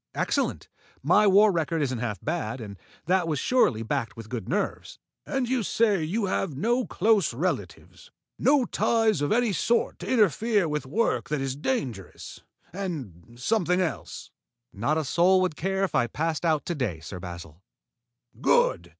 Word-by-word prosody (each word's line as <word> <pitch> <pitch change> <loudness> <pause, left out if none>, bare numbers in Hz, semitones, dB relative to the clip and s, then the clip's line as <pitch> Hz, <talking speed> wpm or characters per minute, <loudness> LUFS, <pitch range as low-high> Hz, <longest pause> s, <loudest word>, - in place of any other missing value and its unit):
"Excellent. - - -1 0.4
My 210 0 +4
war 205 +2 +6
record 165 -1 -1
isn't 130 -4 -2
half 115 -4 -3
bad, 155 -7 -2
and 105 -3 -8 0.3
that 180 -1 +2
was 155 -2 -1
surely 130 - +2
backed 115 +1 -3
with 115 -1 -9
good 120 -2 -5
nerves." 200 +5 -2 0.3
"And 270 -2 -1
you 255 0 0
say 205 -4 +1
you 200 +7 -1
have 185 -6 -2
no 240 - +1
close 205 - +2
relatives, 180 +8 -4 0.3
no 280 -3 +4
ties 225 -10 +1
of 145 - 0
any 230 -1 +2
sort 235 +7 0
to - - -6
interfere 215 - +2
with 150 -3 -3
work 225 +12 0
that 150 -1 -1
is 135 -1 -2
dangerous 135 - -4 0.3
and 125 - -6
something 180 - +1
else?" 165 -9 -4 0.4
"Not 120 +10 0
a 160 - 0
soul 180 +6 +4
would 185 -4 0
care 190 +4 -1
if 195 - -1
I 120 - +2
passed 160 +5 -2
out 155 -3 +1
to 175 - -2
day, 120 - -2
Sir 90 +3 -8
Basil." 85 -2 -9 0.8
"Good! - - +2
165 Hz, 165 wpm, -26 LUFS, 130-210 Hz, 0.8 s, war